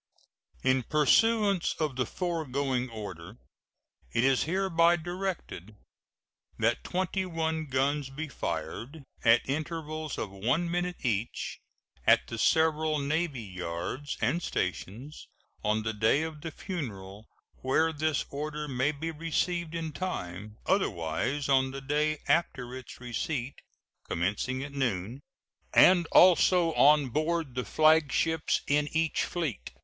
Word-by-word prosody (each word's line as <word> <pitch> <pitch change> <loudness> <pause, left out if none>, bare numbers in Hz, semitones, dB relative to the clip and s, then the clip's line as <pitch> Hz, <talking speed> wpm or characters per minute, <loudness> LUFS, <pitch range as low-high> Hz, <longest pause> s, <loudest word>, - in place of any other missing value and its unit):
] - - -34
In 130 0 +2
pursuance 200 - +3
of 155 -4 -1
the 130 -2 -1
foregoing 140 -7 -2
order, 100 -3 -8 0.7
it 115 - +1
is 135 -1 +3
hereby 170 -1 +3
directed 175 - -5 0.8
that 115 +1 +1
twenty 190 +1 -1
one 160 -3 -2
guns 135 +1 0
be 150 +4 -5
fired, 115 - -5 0.2
at 115 0 +5
intervals 155 +1 -3
of 100 - -4
one 130 - 0
minute 175 -3 -2
each, 110 -1 -2 0.5
at - - +6
the 115 - -6
several 160 0 +3
navy 145 -2 -1
yards 90 +8 -5
and 135 +10 +1
stations, 115 - -4 0.4
on 110 +1 +1
the 110 0 -2
day 110 +8 +2
of 160 -2 -6
the 165 - -4
funeral 110 - -6 0.3
where 160 +5 +1
this 155 -1 0
order 150 +1 -4
may 135 +2 +1
be 160 +3 -4
received 165 +1 -2
in 165 -1 -3
time, 105 - -5
otherwise 130 - 0
on 130 -1 +3
the 135 +1 -6
day 150 +3 0
after 125 -7 0
its 130 - -10
receipt, 125 +2 -4 0.5
commencing 105 +10 -1
at 140 - -7
noon, 120 -2 -2 0.5
and 180 -2 +7
also 180 -1 +6
on 145 -2 +5
board 155 +1 -1
the 125 0 -2
flagships 155 +4 +3
in 145 +1 +1
each 160 -1 +1
fleet. 155 - -3
145 Hz, 125 wpm, -29 LUFS, 120-160 Hz, 0.8 s, and